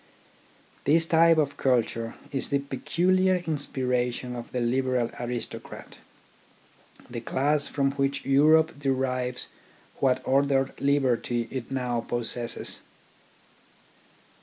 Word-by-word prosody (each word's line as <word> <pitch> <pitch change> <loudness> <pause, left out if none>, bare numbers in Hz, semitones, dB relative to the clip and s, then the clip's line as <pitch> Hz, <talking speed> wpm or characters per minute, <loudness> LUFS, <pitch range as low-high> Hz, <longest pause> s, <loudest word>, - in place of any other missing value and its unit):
His 160 +3 +3
type 165 0 +5
of 145 -2 0
culture 115 -3 0 0.2
is 135 - -2
the 140 - +2
peculiar 180 +7 +1
inspiration 125 -4 -2
of 120 -1 -8
the 125 - -2
liberal 125 0 0
aristocrat, 120 0 -6 1.1
the 120 -1 -6
class 145 +4 +1
from 140 -1 0
which 140 0 -1
Europe 155 +3 +4
derives 130 -2 -1 0.5
what 130 -2 +2
ordered 135 0 +2
liberty 125 -4 +1
it 130 -3 -5
now 125 -3 -1
possesses. 120 0 -2
135 Hz, 100 wpm, -27 LUFS, 125-140 Hz, 1.1 s, type